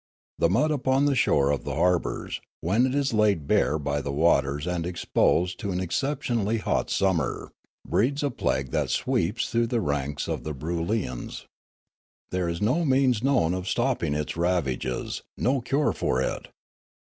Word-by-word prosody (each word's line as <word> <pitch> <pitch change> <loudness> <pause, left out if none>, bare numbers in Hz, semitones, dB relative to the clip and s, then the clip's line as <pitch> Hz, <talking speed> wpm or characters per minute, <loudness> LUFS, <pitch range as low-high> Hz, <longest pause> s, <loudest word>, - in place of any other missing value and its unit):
The 85 - +3
mud 130 - +2
upon 135 -1 +2
the 145 - +3
shore 70 - +3
of 70 - -1
the - - -4
harbours, 90 -1 0 0.2
when 105 +10 +2
it 130 - -2
is 140 -3 +1
laid 105 -8 +2
bare 75 +2 +2
by 70 -1 -2
the 70 - -4
waters 70 -1 +2
and 90 -2 -1
exposed 90 0 +1
to 100 -4 -3
an 90 - -1
exceptionally 115 - -1
hot 105 - -1
summer, 95 -7 0 0.4
breeds 140 +6 +1
a 145 - 0
plague 65 - -1
that - - 0
sweeps 105 +8 0
through 115 0 +2
the 120 0 0
ranks 70 -5 -2
of - - -3
the 75 -1 -4
Broolyians. 85 - -3 0.9
There 90 -2 -1
is 85 +3 -3
no 135 +11 +2
means 130 -5 +3
known 130 -11 +2
of 95 0 -3
stopping 120 - 0
its 75 0 -3
ravages, 85 -8 -1 0.2
no 130 +1 +1
cure 140 +4 +1
for 65 - 0
it. 65 - -2
90 Hz, 165 wpm, -26 LUFS, 75-125 Hz, 0.9 s, The